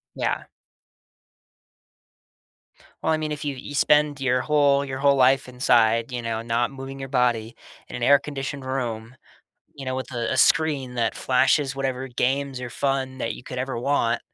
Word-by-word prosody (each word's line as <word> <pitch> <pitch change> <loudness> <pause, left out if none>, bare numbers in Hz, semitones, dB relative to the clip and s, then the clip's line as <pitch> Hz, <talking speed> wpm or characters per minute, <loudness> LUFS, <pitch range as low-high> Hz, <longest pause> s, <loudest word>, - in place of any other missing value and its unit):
Yeah. - - -1 2.6
Well, - - +1
I - - +2
mean, 155 -1 -3
if 150 +1 -5
you 145 -2 -3
you 145 +3 -8
spend 150 0 +3
your 125 -1 +1
whole 145 -2 +3
your 130 -1 -5
whole 140 0 +4
life 130 0 +3
inside, 115 -1 +2
you 120 - -3
know, 115 -1 -2
not 115 +1 0
moving 135 0 -8
your 135 - -5
body 120 -3 0 0.3
in - - -6
an - - -6
air-conditioned 140 -1 +1
room, 120 -3 -4 0.6
you 135 -2 -9
know, 130 - -2
with 130 0 -5
a 120 -1 -2
a - - -1
screen 140 -6 +2
that 115 -1 0
flashes 135 +2 +2
whatever 135 -1 -3
games 130 +1 -1
or 125 - -5
fun 135 0 -2
that 115 - -2
you - - -11
could 125 - -8
ever 130 -1 -3
want 120 -2 +1
130 Hz, 170 wpm, -24 LUFS, 125-140 Hz, 2.6 s, whole